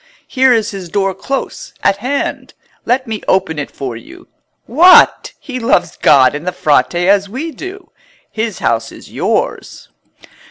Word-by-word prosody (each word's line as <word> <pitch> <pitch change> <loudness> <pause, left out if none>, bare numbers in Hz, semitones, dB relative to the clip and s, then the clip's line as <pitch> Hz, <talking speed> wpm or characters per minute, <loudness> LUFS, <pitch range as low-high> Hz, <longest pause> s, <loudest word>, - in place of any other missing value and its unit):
Here 260 -1 +3
is 225 -2 +1
his 190 -4 -8
door 195 +1 -1
close 270 +8 -5
at 195 - +2
hand. 260 +7 -4 0.3
Let 260 +2 0
me 220 -3 -5
open 185 -5 0
it 145 - -5
for 130 -4 -6
you. 115 - -13 0.4
What! 340 +10 +5
he 255 -3 -7
loves 235 +2 0
God 135 -3 +4
and 150 +4 -7
the - - +1
Frate 155 -1 +1
as 195 +3 +2
we 285 +9 -5
do. 375 +4 -10 0.4
His 220 -2 -3
house 115 -1 -1
is - - -14
yours." - - -3
200 Hz, 155 wpm, -15 LUFS, 175-255 Hz, 0.4 s, What